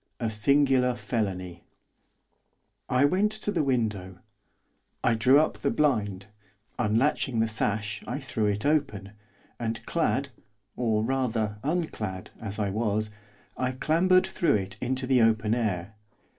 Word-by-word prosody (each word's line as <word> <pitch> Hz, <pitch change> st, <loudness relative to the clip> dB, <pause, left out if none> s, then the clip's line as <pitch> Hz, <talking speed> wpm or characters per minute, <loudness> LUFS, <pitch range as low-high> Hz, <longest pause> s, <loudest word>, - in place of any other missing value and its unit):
A 115 Hz, -3 st, -1 dB
SINGULAR 130 Hz, +2 st, +3 dB
FELONY 95 Hz, -9 st, -3 dB, 1.3 s
I 130 Hz, +3 st, +4 dB
went 195 Hz, +8 st, +2 dB
to 215 Hz, -1 st, -1 dB
the 170 Hz, -6 st, +1 dB
window; 105 Hz, -9 st, -1 dB, 0.9 s
I 115 Hz, -, +3 dB
drew 125 Hz, +6 st, +5 dB
up 155 Hz, -, 0 dB
the -, -, 0 dB
blind, 105 Hz, -10 st, 0 dB, 0.5 s
unlatching 115 Hz, +2 st, +1 dB
the 115 Hz, -, +2 dB
sash, 105 Hz, -1 st, -1 dB
I -, -, -3 dB
threw 125 Hz, -6 st, -1 dB
it 105 Hz, +4 st, -1 dB
open; 135 Hz, -10 st, 0 dB, 0.5 s
and 115 Hz, -1 st, -3 dB
clad, 145 Hz, -4 st, 0 dB, 0.5 s
or, 110 Hz, -3 st, 0 dB
rather, 115 Hz, -4 st, -1 dB
unclad 110 Hz, -, -3 dB
as 105 Hz, -2 st, -5 dB
I 100 Hz, -2 st, -1 dB
was, 110 Hz, 0 st, -1 dB, 0.4 s
I 130 Hz, 0 st, -1 dB
clambered 175 Hz, +7 st, +3 dB
through 165 Hz, -8 st, +1 dB
it 100 Hz, -1 st, -2 dB
into 130 Hz, +1 st, -1 dB
the 130 Hz, -1 st, +3 dB
open 110 Hz, -1 st, +3 dB
air. 105 Hz, -4 st, -2 dB
115 Hz, 130 wpm, -27 LUFS, 105-135 Hz, 1.3 s, drew